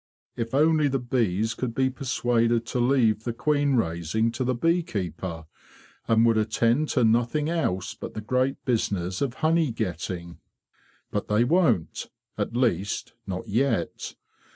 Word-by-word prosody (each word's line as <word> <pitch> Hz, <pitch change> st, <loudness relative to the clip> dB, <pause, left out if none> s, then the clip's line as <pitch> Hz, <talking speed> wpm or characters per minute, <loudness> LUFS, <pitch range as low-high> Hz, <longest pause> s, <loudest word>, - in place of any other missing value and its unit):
"Tf 115 Hz, +2 st, -3 dB
only 155 Hz, 0 st, +4 dB
the 135 Hz, -1 st, 0 dB
bees 115 Hz, -4 st, 0 dB
could 115 Hz, 0 st, -4 dB
be 130 Hz, 0 st, +2 dB
persuaded 120 Hz, -3 st, +1 dB
to 125 Hz, -, -2 dB
leave 120 Hz, -4 st, +3 dB
the 120 Hz, -, -2 dB
queen 145 Hz, +1 st, +1 dB
raising 100 Hz, +2 st, 0 dB
to 120 Hz, +3 st, -3 dB
the 130 Hz, 0 st, 0 dB
bee 165 Hz, +8 st, +2 dB
keeper, 90 Hz, -, -5 dB, 0.6 s
and 115 Hz, 0 st, +4 dB
would 115 Hz, -1 st, +4 dB
attend 115 Hz, +7 st, +1 dB
to 125 Hz, -, +2 dB
nothing 120 Hz, +7 st, +2 dB
else 95 Hz, -, -1 dB
but -, -, -8 dB
the 110 Hz, -, -4 dB
great 130 Hz, +5 st, -1 dB
business 95 Hz, -7 st, -1 dB
of 135 Hz, -3 st, -1 dB
honey 160 Hz, -3 st, +3 dB
getting! 85 Hz, -3 st, -4 dB, 0.7 s
But 105 Hz, -, -2 dB
they 105 Hz, +2 st, +3 dB
won't—at 120 Hz, -, -1 dB
least, 115 Hz, -6 st, 0 dB
not 95 Hz, +5 st, -4 dB
yet. 125 Hz, +7 st, -1 dB
115 Hz, 145 wpm, -26 LUFS, 105-135 Hz, 0.7 s, only